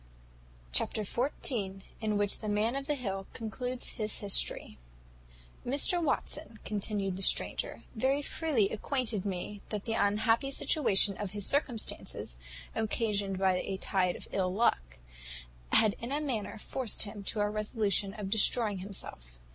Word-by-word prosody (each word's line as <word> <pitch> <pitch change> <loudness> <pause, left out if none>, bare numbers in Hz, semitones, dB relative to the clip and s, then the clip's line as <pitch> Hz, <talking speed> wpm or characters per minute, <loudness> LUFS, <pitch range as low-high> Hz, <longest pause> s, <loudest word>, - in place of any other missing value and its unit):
Chapter 210 - +3
xiv. 210 -4 -1 0.2
In 215 -1 0
which 205 0 +2
the 215 - -4
Man 215 +4 +1
of 275 0 -4
the 295 - +1
Hill 195 -7 -4
concludes 245 +3 -3
his 215 0 +2
history. 200 - +1 0.8
"Mr 290 +7 +2
Watson," 300 -4 -2
continued 200 -2 -2
the - - -6
stranger, - - +2
"very 265 +5 +1
freely 275 -11 +1
acquainted 220 -3 -2
me, 200 +1 -4
that 210 -2 -4
the 225 - -1
unhappy 225 +5 +2
situation 215 - +4
of 205 0 -5
his 205 - +4
circumstances, 240 - 0 0.4
occasioned 205 -3 -1
by 190 -1 +2
a 190 +1 -3
tide 185 -2 0
of - - -8
ill 185 -2 0
luck, - - 0 0.7
had 215 -2 +5
in 235 +3 -5
a 290 - 0
manner 230 -7 -3
forced 240 +1 +1
him 205 -1 -5
to 210 - -1
a 205 - +2
resolution 210 -1 0
of 205 -3 -5
destroying 215 -1 +4
himself. - - -5
210 Hz, 145 wpm, -31 LUFS, 195-240 Hz, 0.8 s, had